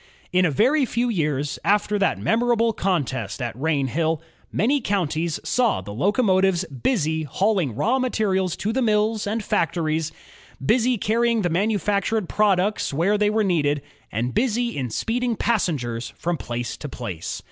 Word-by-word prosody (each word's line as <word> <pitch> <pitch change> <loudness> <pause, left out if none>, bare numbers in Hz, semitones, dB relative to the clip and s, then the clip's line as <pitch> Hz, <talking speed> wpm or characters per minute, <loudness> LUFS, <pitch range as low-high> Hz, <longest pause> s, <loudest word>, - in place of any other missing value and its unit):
In 180 0 +4
a - - 0
very 260 - +3
few 245 0 0
years 150 - -1
after 205 0 +2
that 195 - +2
memorable 230 0 +2
contest 165 - -1
at 120 -3 -3
Rainhill, 155 +3 0 0.3
many 265 +8 +1
counties 170 -6 -1
saw 245 - +1
the 100 +2 -8
locomotives 190 - +2
busy 160 - -1
hauling 180 - 0
raw 230 - +1
materials 195 -8 0
to 215 +2 -2
the 265 - 0
mills 215 -1 +1
and 220 +1 -2
factories, 160 -6 0 0.5
busy 240 - +2
carrying 230 +1 +1
the 175 - 0
manufactured 205 +1 0
products 205 -1 +1
where 170 +9 +2
they 210 0 +2
were 215 +1 +1
needed, 150 -7 +1 0.3
and 120 +4 -2
busy 240 - 0
in 130 -3 -2
speeding 235 - -1
passengers 130 - -1
from 175 0 -1
place 120 -5 -4
to 150 - -7
place. 95 -11 -5
190 Hz, 145 wpm, -23 LUFS, 150-220 Hz, 0.5 s, In